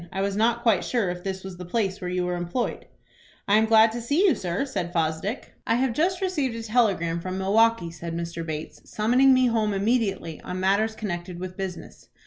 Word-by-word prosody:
I 190 - -2
was 200 0 -1
not 235 +2 +1
quite 220 -6 +3
sure 225 -8 0
if 175 0 -7
this 190 -1 -4
was 190 -2 -8
the 180 - -7
place 195 0 -1
where 180 - -3
you 180 0 -1
were 180 - -1
employed." 175 +8 -3 0.6
"I 205 +1 +5
am 220 0 +3
glad 220 0 +6
to 235 +1 -5
see 290 - +2
you, 365 - +5
sir," 180 +3 -2
said 180 -11 -3
Fosdick. 165 +7 -2
"I 230 - +3
have 255 0 +1
just 360 +8 0
received 300 -11 -1
a 230 - -5
telegram 200 -8 +1
from 185 +1 -4
Milwaukie," 200 -1 +2
said 170 0 -6
Mr. 170 0 -4
Bates, 155 -1 -6
"summoning 250 +5 +3
me 255 -1 +5
home 220 -4 +1
immediately 195 -6 -1
on 180 - -5
matters 200 +4 +1
connected 175 -4 -5
with 185 0 -6
business. 190 -2 -7
200 Hz, 210 wpm, -25 LUFS, 180-230 Hz, 0.6 s, glad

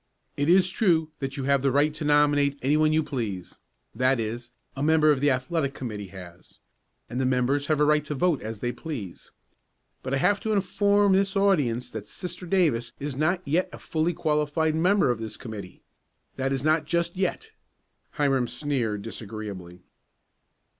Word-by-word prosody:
"It 145 +2 0
is 185 +1 +6
true 170 -5 +1
that 135 0 -4
you 135 - -3
have 140 0 +2
the 135 0 +2
right 145 +3 +2
to 155 - -6
nominate 145 -1 +3
any 140 +3 +3
one 155 0 +3
you 155 0 +2
please 110 -11 -5 0.3
that 130 +2 +2
is, 120 +2 -4 0.2
a 135 - -5
member 155 0 +4
of 145 - +1
the 145 - +4
athletic 140 +2 -1
committee 105 -6 -5
has, 90 -2 -13 0.5
and 130 +2 -2
members 130 +3 +1
have 155 - +2
the 150 - +3
right 150 0 +3
to 150 - -4
vote 170 0 +1
as 110 -1 -6
they 120 - -1
please. 125 - -7 0.7
But 130 +1 -2
I - - +1
have 205 +8 +2
to 220 - -1
inform 200 0 +3
this 195 +1 +2
audience 150 -12 +1
that 105 - -7
Sister 180 0 -7
Davis 155 -11 +1
is 140 -1 -4
not 175 +6 0
yet 165 +6 +1
a - - -9
fully 165 +1 -1
qualified 155 +1 0
member 180 -2 +3
of 120 - -3
this 110 -1 -6
committee. 105 -6 -9 0.5
That 135 0 -1
is 135 +1 -2
not 155 0 +2
just 170 +2 -1
yet." 195 - -2 0.6
Hiram 135 -5 +1
sneered 120 -8 -2
disagreeably. 100 -6 -8
145 Hz, 175 wpm, -26 LUFS, 120-160 Hz, 0.7 s, is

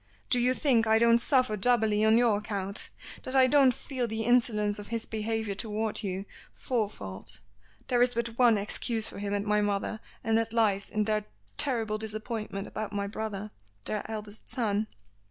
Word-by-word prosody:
"Do 250 - +4
you 250 +1 +2
think 240 -7 +3
I 220 0 +5
don't 235 +1 +5
suffer 255 -3 +2
doubly 215 -1 +2
on 220 +1 +5
your 235 -4 +3
account? 200 -1 -3 0.3
That 255 - -2
I 260 -1 +7
don't 270 0 +5
feel 250 0 -3
the 220 0 -3
insolence 215 -3 +2
of 205 - -8
his 230 -1 -3
behavior 220 -1 -2
toward 215 +1 -1
you 195 -1 -3 0.3
four 230 -5 -1
fold? 100 - -7 0.5
There 245 -1 +2
is 245 0 +3
but 235 0 0
one 240 -3 +6
excuse 220 +2 -1
for - - -5
him 205 0 -2
and 205 0 -2
my 210 0 +2
mother, 205 +1 -1 0.2
and 225 0 +3
that 225 0 -2
lies 205 -4 +2
in 215 - 0
their 210 0 0 0.3
terrible 220 - +1
disappointment 215 -2 -4
about 215 -1 -5
my 200 0 -1
brother 210 0 -5 0.3
their 210 - -1
eldest 215 -1 -7
son." 215 -3 0
220 Hz, 180 wpm, -29 LUFS, 205-235 Hz, 0.5 s, I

